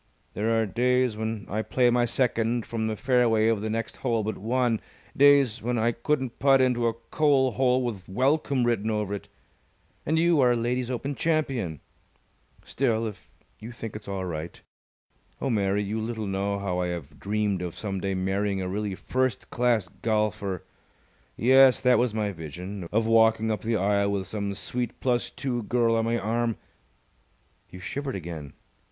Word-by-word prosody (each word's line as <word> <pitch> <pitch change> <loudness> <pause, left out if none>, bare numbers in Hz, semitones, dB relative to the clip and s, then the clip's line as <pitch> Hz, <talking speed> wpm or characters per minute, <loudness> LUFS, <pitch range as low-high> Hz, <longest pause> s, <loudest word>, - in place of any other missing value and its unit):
There 115 +2 +1
are 110 - +2
days 125 +3 +1
when 110 -1 -4
I 105 +2 -2
play 125 +2 +2
my 120 0 +3
second 120 -1 0
from 110 -1 -2
the 110 - -2
fairway 115 -3 +3
of 110 -3 +1
the 110 - -2
next 115 +1 -3
hole 115 -4 0
but 110 -1 -2
one, 120 +1 0 0.3
days 140 -4 +5
when 120 +1 -1
I 115 +1 +2
couldn't 130 +1 -2
putt 135 0 +5
into 125 -2 +2
a 115 - +1 0.2
coal 140 -4 +3
hole 130 +1 +2
with 105 -7 -5
'Welcome!' 135 +4 +1
written 110 -2 0
over 105 -2 -1
it. 100 - -6 0.8
And 160 +2 0
you 165 -2 +4
are 125 -1 +5
a - - +1
Ladies' 120 +1 -1
Open 130 +3 -3
Champion. 135 - -1 0.8
Still, 115 -4 0
if 105 -3 -9 0.2
you 115 - -8
think 115 -3 -7
it's 105 - -8
all 95 -1 -3
right. 80 -1 -5 0.8
Oh, 135 - -1
Mary, 100 -2 +1
you 110 +2 -3
little 110 -1 -3
know 100 +1 -1
how 95 -3 -2
I 90 - 0
have 85 -5 -6
dreamed 105 -2 -1
of 90 -2 -5
some 100 -3 -4
day 95 0 -1
marrying 95 +1 -1
a 95 - -2
really 100 +1 -2
first 130 +1 -2
class 120 -5 +1
golfer! 105 -4 -1 0.7
Yes, 130 +2 +6
that 125 -1 +4
was 120 -3 +1
my 105 -2 0
vision 90 +2 -7
of 110 +1 +2
walking 110 0 +4
up 105 -3 -2
the 115 0 0
aisle 100 +1 +2
with 95 -1 -2
some 100 -1 -3
sweet 120 +3 -4
plus 125 -2 0
two 125 -3 -3
girl 115 +1 +1
on 115 0 +1
my 115 +1 +1
arm. 115 +1 -1 1.1
You 90 - -10
shivered 140 +7 -4
again. 80 -6 -7
115 Hz, 175 wpm, -26 LUFS, 100-125 Hz, 1.1 s, Yes